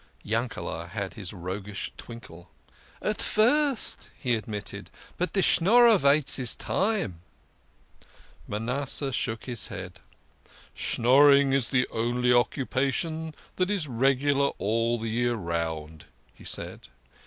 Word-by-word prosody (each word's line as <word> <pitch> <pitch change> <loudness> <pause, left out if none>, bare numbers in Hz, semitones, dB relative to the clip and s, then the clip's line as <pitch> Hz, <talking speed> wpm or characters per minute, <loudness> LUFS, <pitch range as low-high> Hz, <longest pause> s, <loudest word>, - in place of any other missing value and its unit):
Yankele" 100 -7 -3
had 100 0 -4
his 100 -5 -5
roguish 95 +2 -6
twinkle. 90 -8 -11 0.3
" - - -27
At 210 -1 -1
first," 270 +4 +1
he 125 -2 -1
admitted, 105 -2 -5
" - - -23
but 180 - -1
de 195 - +2
Schnorrer 225 +4 +5
vaits 140 0 +3
his 125 -3 +3
time." 195 - -1 1.3
Manasseh 135 +6 -1
shook 110 -3 -2
his 120 -4 -3
head. 95 -2 -8 0.4
" - - -35 0.3
Schnorring 140 +3 +4
is 135 -4 +1
the 125 -1 +2
only 120 +2 0
occu 125 +2 +2
pation 155 +4 -1 0.2
that 185 +1 +1
is 195 -7 -1
regular 135 +3 +2
all 115 +3 0
the 115 0 -4
year 120 +1 0
round," 80 -4 -4 0.3
he - - -16
said. - - -5
120 Hz, 130 wpm, -27 LUFS, 105-145 Hz, 1.3 s, Schnorrer